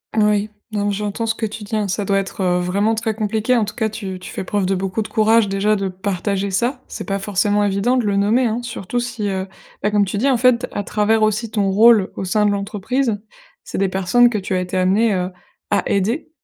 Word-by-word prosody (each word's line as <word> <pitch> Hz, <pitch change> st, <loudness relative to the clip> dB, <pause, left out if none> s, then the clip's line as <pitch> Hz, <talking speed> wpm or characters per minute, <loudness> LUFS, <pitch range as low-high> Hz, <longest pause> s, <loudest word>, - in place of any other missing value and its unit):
Oui, 210 Hz, -1 st, +2 dB, 0.2 s
non 205 Hz, -1 st, -1 dB
mais 205 Hz, -, +1 dB
j'entends 210 Hz, +3 st, -3 dB
ce 225 Hz, -, +1 dB
que 225 Hz, 0 st, -3 dB
tu 215 Hz, +1 st, -8 dB
dis, 205 Hz, +2 st, -4 dB
hein, 210 Hz, -2 st, 0 dB
ça 200 Hz, +2 st, -2 dB
doit 195 Hz, 0 st, +2 dB
être, 195 Hz, 0 st, -5 dB
heu, 180 Hz, -1 st, +2 dB
vraiment 200 Hz, +5 st, +1 dB
très 220 Hz, -1 st, -2 dB
compliqué. 220 Hz, +3 st, 0 dB
En 220 Hz, -, +2 dB
tout 210 Hz, -, -7 dB
cas 220 Hz, -2 st, -1 dB
tu 195 Hz, -4 st, -6 dB
tu 185 Hz, -, -9 dB
fais -, -, -4 dB
preuve 195 Hz, 0 st, -1 dB
de 195 Hz, -, +1 dB
beaucoup 190 Hz, +3 st, -2 dB
de 210 Hz, -, -4 dB
courage 220 Hz, 0 st, +3 dB
déjà 200 Hz, +2 st, +1 dB
de 195 Hz, -1 st, -2 dB
partager 195 Hz, +1 st, -2 dB
ça. 240 Hz, +7 st, -1 dB
C'est -, -, -7 dB
pas 195 Hz, 0 st, 0 dB
forcément 205 Hz, +1 st, +1 dB
évident 205 Hz, +5 st, +1 dB
de 240 Hz, -, 0 dB
le 200 Hz, -, +1 dB
nommer, 215 Hz, +6 st, +3 dB
hein, 225 Hz, 0 st, 0 dB
surtout 240 Hz, -1 st, -4 dB
si, 225 Hz, -3 st, -3 dB
heu, 190 Hz, 0 st, -3 dB, 0.3 s
bah, 210 Hz, -, +1 dB
comme 205 Hz, -1 st, +2 dB
tu 200 Hz, +2 st, -3 dB
dis 275 Hz, +5 st, +2 dB
en 255 Hz, -, +3 dB
fait, 250 Hz, 0 st, +3 dB
à 205 Hz, -, -3 dB
travers 215 Hz, +2 st, +1 dB
aussi 215 Hz, +1 st, 0 dB
ton 205 Hz, -3 st, 0 dB
rôle 215 Hz, -1 st, +5 dB
au -, -, -4 dB
sein 210 Hz, +3 st, +2 dB
de 205 Hz, -, +3 dB
l'entreprise, 205 Hz, +4 st, -1 dB, 0.4 s
c'est -, -, -5 dB
des 195 Hz, -, +2 dB
personnes 195 Hz, +6 st, +3 dB
que 220 Hz, -, -2 dB
tu 190 Hz, -1 st, -3 dB
as 185 Hz, -, +1 dB
été 180 Hz, +1 st, -3 dB
amenée, 195 Hz, +4 st, +3 dB
heu, 180 Hz, 0 st, -2 dB, 0.4 s
à -, -, +3 dB
aider. 215 Hz, +12 st, 0 dB
205 Hz, 250 wpm, -20 LUFS, 195-225 Hz, 0.4 s, rôle